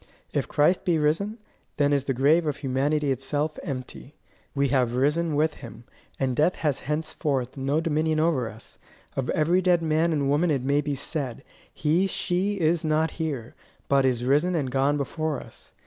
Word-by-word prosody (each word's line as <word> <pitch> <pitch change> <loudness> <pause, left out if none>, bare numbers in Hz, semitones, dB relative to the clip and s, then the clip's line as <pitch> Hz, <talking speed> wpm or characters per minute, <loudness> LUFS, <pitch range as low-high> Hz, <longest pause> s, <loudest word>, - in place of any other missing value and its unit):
If - - 0
Christ 155 +5 +2
be 175 -3 +2
risen, 165 +9 0 0.4
then 145 0 +3
is 140 -1 +1
the 135 - -1
grave 155 +6 +3
of 145 - -1
humanity 140 +2 0
itself 145 +4 -2
empty. 135 -1 -7 0.4
We 140 -1 +2
have 125 -3 +1
risen 150 +4 +1
with 155 +1 +1
him, 120 -2 -10 0.4
and 130 -2 0
death 155 +7 +2
has 145 -4 -1
henceforth 150 -4 -2
no 140 +3 0
dominion 155 -1 0
over 155 -8 +1
us. 110 +1 -13 0.4
Of 135 -2 -2
every 170 +4 +2
dead 175 -2 +3
man 160 +1 +2
and 145 -3 0
woman 150 +5 +2
it 140 -5 0
may 140 +2 +2
be 145 -1 -2
said: 135 -2 -3 0.3
He 165 +6 +1
she 190 +2 -1
is 165 0 +2
not 155 0 +1
here, 140 -8 -3 0.3
but 140 -1 +3
is 125 -2 +1
risen 150 +7 +2
and 140 -6 -1
gone 140 +2 +2
before 155 +2 -2
us. - - -13
150 Hz, 180 wpm, -26 LUFS, 135-160 Hz, 0.4 s, then